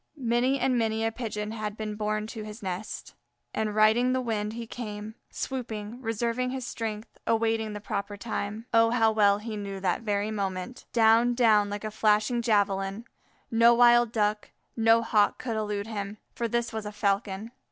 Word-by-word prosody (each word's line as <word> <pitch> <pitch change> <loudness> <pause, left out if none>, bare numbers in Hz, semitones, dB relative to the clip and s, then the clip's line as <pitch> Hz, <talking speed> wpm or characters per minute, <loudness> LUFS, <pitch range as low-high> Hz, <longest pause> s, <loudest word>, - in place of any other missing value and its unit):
Many 250 +1 +1
and 255 -2 +2
many 225 0 0
a 225 - +1
Pigeon 215 -3 -4
had 215 -1 -4
been 215 -1 -4
borne 215 0 -2
to 220 0 -7
his 210 +1 -9
nest, 190 +3 -5 0.4
and 215 -1 -1
riding 220 +4 +4
the 260 - +1
wind 215 -3 -2
he 235 0 -5
came, 215 -2 -6 0.2
swooping, 230 -3 -5
reserving 235 +2 -1
his 260 -1 -4
strength, 220 -3 -5
awaiting 225 -1 +1
the 210 - -5
proper 205 0 -4
time. 215 0 -4
Oh, 230 0 +5
how 225 -2 +3
well 205 -2 +4
he 215 +1 -6
knew 200 -1 -5
the 185 -2 0
very 205 0 0
moment! 200 +3 -4
Down, 230 +1 +4
down 215 -4 +4
like 205 +1 -5
a 215 - -3
flashing 215 +2 +2
javelin; 200 -1 +1 0.5
no 230 +1 +6
wild 240 -1 +6
Duck, 210 -1 0 0.3
no 225 0 +4
Hawk 210 -2 +3
could 235 -3 -4
elude 210 -2 -2
him, 205 -2 -5 0.2
for 235 - -2
this 235 +1 -1
was 220 -1 -4
a - - -5
Falcon. 205 +1 -1
220 Hz, 175 wpm, -28 LUFS, 210-230 Hz, 0.5 s, no